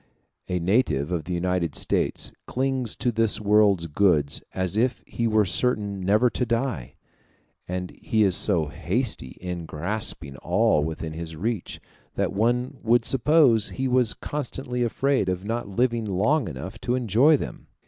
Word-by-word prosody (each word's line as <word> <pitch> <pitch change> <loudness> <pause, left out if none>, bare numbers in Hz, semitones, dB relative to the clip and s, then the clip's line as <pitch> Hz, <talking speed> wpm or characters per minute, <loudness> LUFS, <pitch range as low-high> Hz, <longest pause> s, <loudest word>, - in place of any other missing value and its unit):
A 90 - -1
native 90 - +1
of 85 -4 -2
the 90 - -4
United 90 -3 -1
States - - 0 0.2
clings 130 -3 -1
to 125 - 0
this 115 -1 +1
world's 105 -4 +3
goods 75 -3 +1
as 95 0 -2
if 125 +3 0
he 115 - -2
were 110 -1 +3
certain 105 -1 0
never 105 +6 +3
to - - -1
die; 115 - -2 0.7
and 90 0 -4
he 110 -1 0
is 95 -3 +3
so 90 -7 +2
hasty 90 - -2
in 90 -2 -5
grasping 85 -3 -2
at 70 - -12
all 75 - +2
within 80 0 -4
his 80 0 -6
reach, 105 +3 -3 0.4
that - - -1
one 125 +6 0
would 115 0 +3
suppose 135 -5 +4
he 130 0 -2
was 125 -3 +3
constantly 130 -3 -4
afraid 130 -2 +1
of 90 +1 -3
not 115 -1 -3
living 120 +2 0
long 110 +8 +1
enough 75 +5 -7
to 125 - 0
enjoy 125 +6 +4
them. - - -7
105 Hz, 160 wpm, -25 LUFS, 90-125 Hz, 0.7 s, suppose